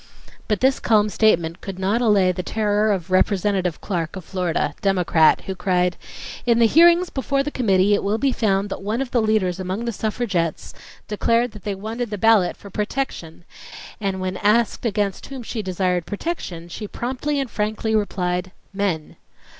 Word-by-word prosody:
." - - -24
But 210 -2 0
this 265 +1 +3
calm 215 -2 +3
statement 170 -6 +1
could 195 -2 -6
not 200 +5 0
allay 200 -5 +4
the 180 - -4
terror 210 +2 +1
of 185 -2 -3
Representative 185 -2 +1
Clark 170 -3 -3
of 185 -3 -8
Florida, 180 -6 -1
Democrat, 180 -5 +3
who 190 - -5
cried: 180 -2 0 0.5
"In 235 -1 +3
the 235 - +5
hearings 340 +7 +5
before 275 0 0
the 295 - -4
committee 200 -6 +2
it 205 - +1
will 205 +2 0
be 270 +4 +1
found 200 -4 0
that - - -5
one 210 +4 -2
of 270 -2 -3
the 240 - +2
leaders 210 -5 +1
among 190 +5 -3
the 235 - -1
suffragettes 205 -7 -2 0.3
declared 230 +3 +1
that 210 -2 -13
they 205 -2 -2
wanted 225 +4 -4
the 210 - -4
ballot 215 -3 +3
for 200 - -12
'protection', 210 -7 -4 0.6
and 195 -3 -2
when 185 0 -3
asked 220 +3 +2
against 205 -3 -2
whom 265 -3 -7
she 225 0 -4
desired 185 -2 -1
'protection' 200 - -5
she 210 +5 -7
promptly 265 +6 -3
and 270 -4 -3
frankly 215 +1 -1
replied, 180 -3 -1 0.2
'men. 190 -6 -2
205 Hz, 180 wpm, -22 LUFS, 185-230 Hz, 0.6 s, the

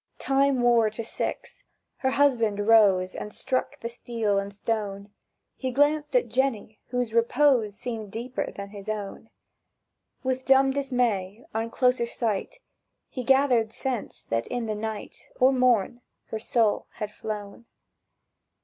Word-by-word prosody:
Time 275 -2 +2
wore 235 -2 +4
to 215 +2 -5
six. - - -5 0.3
Her 265 - 0
husband 230 -7 +2
rose 195 -5 +5
And 210 - -6
struck 265 +4 -2
the 230 - -3
steel 230 -4 -1
and 200 0 -5
stone; 205 -1 -3 0.4
He 260 - -3
glanced 295 - +1
at - - +3
Jenny, 245 -5 -1
whose 245 -2 -2
repose 230 -2 +3
Seemed 220 -4 -5
deeper 240 +4 -4
than 200 0 -8
his 200 0 -9
own. 215 +1 -5 0.9
With 260 0 -1
dumb 270 0 +5
dismay, 245 -7 -1
on 225 +1 -2
closer 250 0 +2
sight, 230 - -2 0.5
He 255 - -5
gathered 255 -4 +3
sense 250 -2 -4
that 115 0 -2
in 245 -2 -3
the 215 - -2
night, 215 0 -6
Or 260 +2 +5
morn, 245 -2 +2 0.3
her 220 - -3
soul 225 -1 +1
had 210 -2 -5
flown. 210 +2 -7
230 Hz, 140 wpm, -26 LUFS, 210-260 Hz, 0.9 s, rose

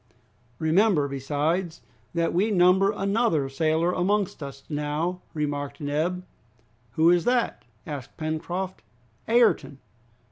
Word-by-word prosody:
"Remember, 160 - +3
besides, 150 +6 -2 0.3
that 170 0 +1
we 195 +6 +2
number 190 0 +4
another 200 - +1
sailor 160 +4 +1
amongst 190 0 0
us 140 -1 -8
now," 150 +4 -2
remarked 145 -2 -3
Neb. 160 +5 -1 0.7
"Who 160 +5 +5
is 175 -1 +3
that?" 245 -1 +1 0.2
asked 145 -5 -7
Pencroft. 175 +4 -3 0.5
"Ayrton." 230 - +3
165 Hz, 105 wpm, -26 LUFS, 150-190 Hz, 0.7 s, Who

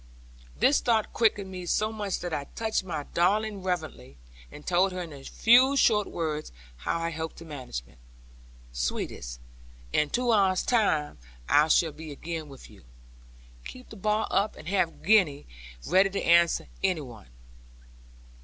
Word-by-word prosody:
This 275 - +4
thought 225 -3 +1
quickened 205 -4 +1
me 180 -1 -7
so 215 +5 +1
much 205 -3 -3
that 175 -2 -4
I 145 -2 -2
touched 220 -3 -1
my 160 -5 -4
darling 205 +4 +1
reverently, 160 - -4 0.3
and 150 - -12
told 185 +2 +2
her 180 - -4
in 165 -3 -9
a 140 -1 -11
few 255 - +4
short 210 -5 +3
words 155 -2 -3 0.3
how 60 - -2
I 165 0 -2
hoped 160 0 -5
to 165 - -10
manage 130 - -6
it. - - -22 0.7
'Sweetest, - - -4 0.5
in 150 -1 +2
two 245 +4 +1
hours' 190 -4 +3
time, 160 - +1 0.3
I 150 +1 +5
shall 160 0 +3
be 155 0 -9
again 160 +1 -6
with 135 -2 -12
you. - - -17 0.8
Keep 255 - -11
the - - -10
bar 215 +2 0
up, 200 +2 +1
and 155 - -12
have 185 -4 0
Gwenny 180 -9 +3 0.4
ready 190 +1 +4
to 195 - -3
answer 170 0 +4 0.2
any 185 -5 +1
one. 120 - -11
175 Hz, 160 wpm, -27 LUFS, 150-210 Hz, 0.8 s, I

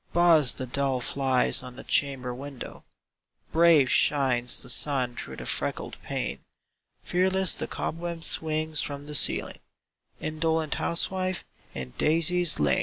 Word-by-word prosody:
Buzz 165 -6 +4
the 130 - -5
dull 135 0 -1
flies 130 0 +1
on 125 -1 -10
the - - -9
chamber 135 -3 0
window; 135 +1 -9 0.7
Brave 160 -5 +4
shines 130 -4 +2
the 125 - -9
sun 125 -1 +3
through - - -7
the - - -8
freckled - - -2
pane; - - -4 0.6
Fearless 190 +1 +1
the - - -3
cobweb 170 0 -5
swings 155 -1 -1
from 145 0 -6
the 150 - -8
ceiling - - +2 0.6
Indolent 160 0 -1
housewife, 185 +2 -1 0.3
in 65 -2 -5
daisies 165 +2 +3
lain! 75 -2 +2
150 Hz, 130 wpm, -26 LUFS, 130-165 Hz, 0.7 s, Buzz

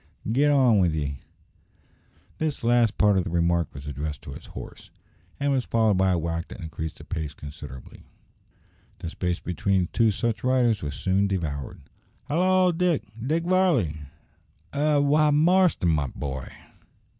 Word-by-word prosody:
git 140 +5 +3
on 130 -7 +4
with 85 -4 +2
ye!" 70 -3 -3 1.2
This 155 -5 -2
last 120 -2 +3
part 105 -2 +4
of - - 0
the - - -4
remark 85 0 +1
was 70 +1 -10
addressed 75 +1 -5
to - - -8
his - - -10
horse, - - -10 0.5
and 140 0 +1
was 130 -2 +1
followed 110 -4 +2
by 95 0 +3
a 90 - +2
whack 85 +1 -3
that - - -10
increased 80 -2 -6
the - - -12
pace 75 -2 -5
considerably. 70 -3 -10 1.0
The 80 - -6
space 90 -1 -2
between 90 +1 0
two 115 -1 +4
such 110 0 -2
riders 125 -4 +2
was 70 -2 -4
soon 95 +1 +1
devoured. 80 -8 -4 0.4
"Hallo! 185 +4 +3
Dick 175 -2 +1 0.2
Dick 160 +6 0
Varley!" 175 - +2 0.8
"Eh! 150 +1 +2
why, 145 +2 +4
Marston, 165 - +3
my 75 -4 +1
boy!" 65 -1 -5
100 Hz, 155 wpm, -25 LUFS, -, 1.2 s, on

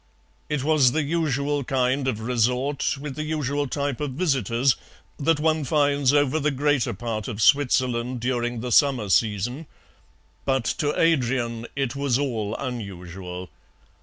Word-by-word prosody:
It 150 -3 -1
was 145 -5 +4
the 155 0 +1
usual 145 -2 0
kind 130 +1 0
of 110 -4 -1
resort, 125 +5 0
with 140 -2 -6
the 155 - -4
usual 145 -2 -1
type 140 0 -2
of 145 -3 -2
visitors, 130 - +1 0.4
that 155 +1 +2
one 155 0 +1
finds 145 -1 +2
over 145 +1 +2
the 150 0 +1
greater 145 -2 +1
part 110 +1 -4
of 110 -4 -5
Switzerland 125 -2 +2
during 120 -1 -1
the 125 0 -4
summer 130 -6 +3
season, 115 - 0 0.8
but 135 -3 0
to 145 -1 0
Adrian 120 -7 +1
it 135 -2 -1
was 140 -3 +1
all 115 -7 -2
unusual. 90 -6 -6
130 Hz, 140 wpm, -24 LUFS, 120-145 Hz, 0.8 s, was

